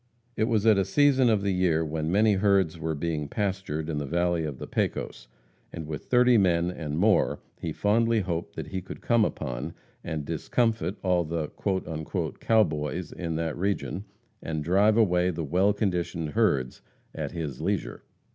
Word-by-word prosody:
It 110 - +1
was 110 -3 +1
at 110 -3 +6
a - - +3
season 135 0 +4
of 105 -3 +2
the 100 -1 +1
year 85 -3 +2
when 80 +1 -2
many 105 +3 +4
herds 95 -4 +2
were 80 0 -2
being 75 -1 -2
pastured 95 -4 -2
in 75 -3 -2
the 75 - -4
valley 85 +1 0
of 75 -4 -5
the - - -6
Pecos, - - -3 0.4
and 80 - -6
with 75 -2 -6
thirty 125 -2 +5
men 85 -2 +2
and 75 -4 -4
more 105 +4 +3 0.2
he 80 - -3
fondly 115 +5 +2
hoped 85 -2 -4
that - - -6
he 95 - -3
could 95 - -9
come 115 -2 +3
upon, 60 -11 -3 0.3
and 75 -2 -4
discomfit 95 +4 0
all 90 -2 +2
the 80 -1 -3 0.9
"cow 110 -1 +4
boys" 80 0 -3
in 85 -2 -4
that 80 -1 -2
region, 100 +1 -2 0.4
and 80 -1 -3
drive 100 +6 +3
away 90 -5 +3
the 85 -2 -3
well 90 +7 +3
conditioned 90 -6 -1
herds 70 - +1 0.3
at - - -4
his 75 -6 -5
leisure. - - -2
90 Hz, 175 wpm, -27 LUFS, 80-105 Hz, 0.9 s, at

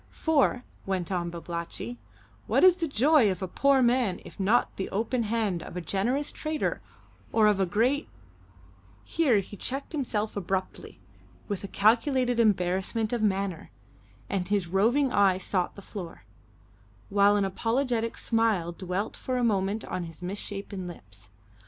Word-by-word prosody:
"For" 285 -5 +1 0.2
went 190 -2 -2
on 175 -2 -1
Babalatchi 170 +7 -6 0.5
"what - - +3
is 370 -1 +7
the 335 -3 -1
joy 280 -2 +4
of 185 0 -3
a - - -2
poor 275 +7 +3
man 240 -6 +2
if - - -13
not 210 +5 +2
the 190 - -3
open 230 +5 -1
hand 215 -5 -1
of 180 - -8
a - - -1
generous 235 - -1
trader 310 -1 -2 0.5
or 220 -1 +4
of 210 -2 +4
a 190 - +2
great 245 - +1 0.5
" 90 +2 -27 0.2
Here 260 - +2
he 195 - -10
checked 270 +7 -4
himself 230 -8 -2
abruptly 190 -1 -4 0.5
with 205 -2 -4
a - - -4
calculated 245 +4 +2
embarrassment 205 +2 +1
of 240 - 0
manner, 195 -4 -1 0.6
and 185 -2 -2
his 200 -2 +1
roving 230 +10 +2
eye 195 -2 +4
sought 185 -1 -2
the 200 - -11
floor, 185 -5 -8 0.9
while 200 0 +4
an 200 -1 +2
apologetic 230 +3 -1
smile 225 -7 +1
dwelt 185 +4 -3
for 255 -1 -3
a 245 - 0
moment 205 -1 0
on 180 - -4
his 165 +1 -11
misshapen 195 0 -5
lips. 100 - -12
205 Hz, 155 wpm, -28 LUFS, 185-245 Hz, 0.9 s, is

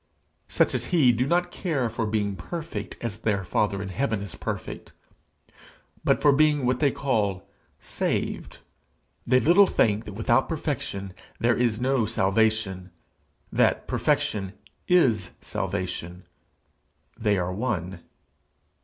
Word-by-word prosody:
Such - - +2
as - - -1
he 155 -9 +4
do 125 +3 0
not 175 +2 +1
care 150 -11 -1
for 115 0 -2
being 105 -2 -1
perfect 165 - -6
as 110 -3 -4
their 100 -3 0
Father 100 +1 0
in 95 - -6
heaven 105 0 -1
is 100 - -6
perfect, - - -6 1.1
but - - +2
for 145 - +7
being 150 -1 +3
what 125 0 +1
they 145 - +4
call 105 -9 -1 0.3
saved. - - -3 0.7
They 130 +1 +5
little 180 +8 +6
think 110 +1 +1
that 105 - -7
without 120 +5 +1
perfection 115 - -3 0.3
there 120 0 +3
is 120 -3 +1
no 125 -3 +1
salvation 100 -2 +1 0.6
that - - +2
perfection 95 -2 0 0.3
is 115 - +3
salvation: 90 0 -4 0.9
they 105 -2 +1
are 90 0 -1
one. 95 -5 -3
110 Hz, 125 wpm, -26 LUFS, 100-135 Hz, 1.1 s, for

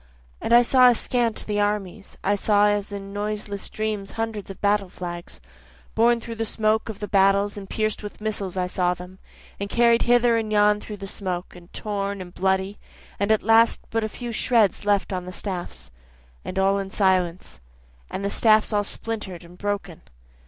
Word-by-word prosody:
And - - -3
I 240 +1 +8
saw 255 +1 +6
askant 240 -1 0
the 210 -1 -1
armies, 205 -1 -2
I 200 - +2
saw 205 0 +3
as 205 0 -1
in 200 -1 -7
noiseless 205 -1 -4
dreams 215 -2 -3
hundreds 225 -3 -4
of 195 - -8
battle 205 -2 +1
flags, 175 - -7 0.5
Borne 235 +1 +4
through 230 0 -7
the 225 - -1
smoke 215 0 0
of 215 - -5
the 210 - -4
battles 200 +1 +3
and 200 -2 -8
pierc'd 215 -1 -1
with 210 -1 -8
missiles 205 -3 -3
I 180 - +1
saw 180 0 0
them, 180 +2 -11 0.4
And 200 0 -3
carried 235 +1 +4
hither 240 -1 +4
and 220 -1 -2
yon 210 0 +4
through 210 - -8
the 195 - -7
smoke, 185 -2 -4
and 175 0 -15
torn 200 -1 -3
and 180 -1 -9
bloody, 190 +1 0 0.4
And 200 +2 +1
at 220 - +3
last 225 +1 +5
but 225 0 0
a 220 - -2
few 240 +2 -6
shreds 225 -3 +2
left 205 -1 +2
on 180 -1 -3
the 180 - -7
staffs, 180 - -5 0.5
(and - - -6
all 195 +1 +3
in 195 -1 -4
silence,) 185 - 0 0.5
And 200 - -4
the 200 - -1
staffs 215 0 +4
all 205 0 +2
splinter'd 205 -4 -5
and 170 +1 -14
broken. 200 -3 -4
205 Hz, 190 wpm, -24 LUFS, 190-220 Hz, 0.5 s, I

